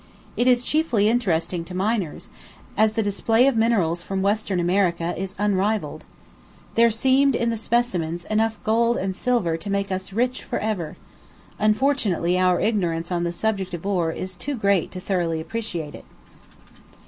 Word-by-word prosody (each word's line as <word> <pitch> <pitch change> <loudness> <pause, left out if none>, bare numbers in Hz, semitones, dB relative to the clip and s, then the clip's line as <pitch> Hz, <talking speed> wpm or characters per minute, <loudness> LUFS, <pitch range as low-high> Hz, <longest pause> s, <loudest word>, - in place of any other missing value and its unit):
It 245 - +1
is 245 -1 +4
chiefly 250 -9 +1
interesting 185 -7 0
to 180 - -8
miners, 195 -3 -2 0.5
as 215 +1 +3
the 225 - 0
display 225 +4 +2
of 275 -2 +3
minerals 200 -7 +2
from 190 +1 -3
Western 200 -2 0
America 175 -1 +1
is 190 0 -5
unrivalled. 205 +1 0 0.7
There 235 0 +5
seemed, 265 +4 +3
in 235 0 0
the - - -1
specimens, 190 -7 -1
enough 220 +1 0
gold 230 +2 +2
and 190 0 -2
silver 205 -8 0
to 185 +5 -7
make 200 0 -1
us 185 +1 -3
rich 250 +5 -1
for - - -3
ever; 185 -8 -3 0.6
unfortunately 210 - +1
our 180 -1 +3
ignorance 175 -6 -1
on 175 -1 0
the 170 - -1
subject 190 -1 -1
of 170 - -9
ore 180 -5 0
is 185 +2 -5
too 285 +10 -4
great 200 -6 +1
to 185 - -5
thoroughly 175 -4 -1
appreciate 170 -3 -5
it. - - -11
200 Hz, 160 wpm, -23 LUFS, 175-225 Hz, 0.7 s, There